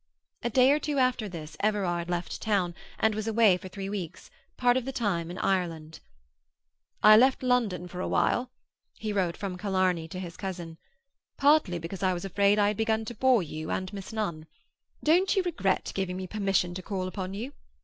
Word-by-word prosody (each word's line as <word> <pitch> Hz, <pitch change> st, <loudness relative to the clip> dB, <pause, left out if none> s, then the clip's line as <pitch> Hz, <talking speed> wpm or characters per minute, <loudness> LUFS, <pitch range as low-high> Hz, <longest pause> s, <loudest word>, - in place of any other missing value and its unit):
A 240 Hz, -, -1 dB
day 255 Hz, +3 st, +5 dB
or 295 Hz, -, +3 dB
two 295 Hz, -1 st, -2 dB
after 255 Hz, -5 st, +1 dB
this 160 Hz, -3 st, -8 dB
Everard 185 Hz, -5 st, 0 dB
left 175 Hz, 0 st, -3 dB
town, 195 Hz, -5 st, +1 dB, 0.2 s
and 220 Hz, 0 st, +2 dB
was 215 Hz, +1 st, -3 dB
away 220 Hz, -4 st, +5 dB
for 185 Hz, -, -9 dB
three 195 Hz, +1 st, -6 dB
weeks, 185 Hz, -4 st, -6 dB, 0.3 s
part 245 Hz, -1 st, +3 dB
of 260 Hz, -, 0 dB
the 270 Hz, -, -3 dB
time 190 Hz, -10 st, -1 dB
in 180 Hz, -, -7 dB
Ireland. 165 Hz, -4 st, -1 dB, 1.0 s
"I 215 Hz, 0 st, +9 dB
left 260 Hz, +4 st, +4 dB
London 230 Hz, -8 st, +1 dB
for 180 Hz, 0 st, -8 dB
a -, -, -2 dB
while," 250 Hz, +1 st, +1 dB, 0.5 s
he 215 Hz, -1 st, -3 dB
wrote 185 Hz, -4 st, 0 dB
from 185 Hz, -3 st, -5 dB
Killarney 185 Hz, -4 st, 0 dB
to 180 Hz, +3 st, -7 dB
his 175 Hz, -3 st, -7 dB
cousin, 175 Hz, -4 st, -6 dB, 0.6 s
"partly 285 Hz, -, +4 dB
because 170 Hz, +3 st, -7 dB
I 185 Hz, -1 st, +2 dB
was 175 Hz, -, -5 dB
afraid 200 Hz, +2 st, +3 dB
I 205 Hz, -1 st, +4 dB
had 210 Hz, -, -3 dB
begun 220 Hz, 0 st, 0 dB
to 240 Hz, -, -6 dB
bore 250 Hz, -2 st, +3 dB
you 155 Hz, 0 st, -6 dB
and 185 Hz, +1 st, -3 dB
Miss 195 Hz, +1 st, -7 dB
Nunn. 170 Hz, -8 st, -3 dB, 0.6 s
Don't 360 Hz, +6 st, +3 dB
you 385 Hz, -, +2 dB
regret 250 Hz, -, -1 dB
giving 185 Hz, -2 st, -2 dB
me 185 Hz, -, -4 dB
permission 195 Hz, -3 st, 0 dB
to 185 Hz, -, -5 dB
call 185 Hz, -1 st, -3 dB
upon 185 Hz, 0 st, -5 dB
you? 245 Hz, +7 st, -5 dB
195 Hz, 195 wpm, -28 LUFS, 180-225 Hz, 1.0 s, I